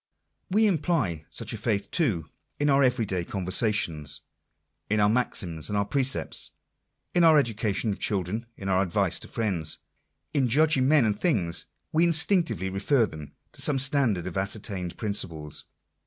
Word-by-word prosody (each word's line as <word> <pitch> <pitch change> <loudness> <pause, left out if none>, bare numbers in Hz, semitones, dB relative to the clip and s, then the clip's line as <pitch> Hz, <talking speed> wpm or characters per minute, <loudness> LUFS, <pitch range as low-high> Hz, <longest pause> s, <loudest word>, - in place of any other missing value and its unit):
We 215 +4 +3
imply 150 - 0
such - - -5
a - - -4
faith, 100 -3 -1
too, 115 - 0 0.3
in 145 0 +2
our 135 0 +4
every 125 -3 +2
day 95 -3 -2
conversations; 90 - 0 0.7
in 105 +1 +1
our 105 - +4
maxims 90 -9 0
and 100 -1 -1
precepts, 135 -1 0 0.6
in 175 - +3
our 160 -2 +7
education 110 -4 0
of - - -10
children, 105 +4 -2
in 95 - -6
our 95 -1 +2
advice 90 -3 0
to - - -9
friends. 90 -9 -1 0.6
In 135 -4 +2
judging 145 0 +3
men 145 -4 +5
and 105 -1 0
things 95 - 0 0.2
we 160 +2 +3
instinctively 170 - +2
refer 110 +6 +2
them 75 -7 -10 0.2
to - - -6
some 145 - +4
standard 130 - +1
of 95 0 -5
ascertained 95 -2 -3
principles. 85 -8 -3
105 Hz, 155 wpm, -26 LUFS, 95-140 Hz, 0.7 s, our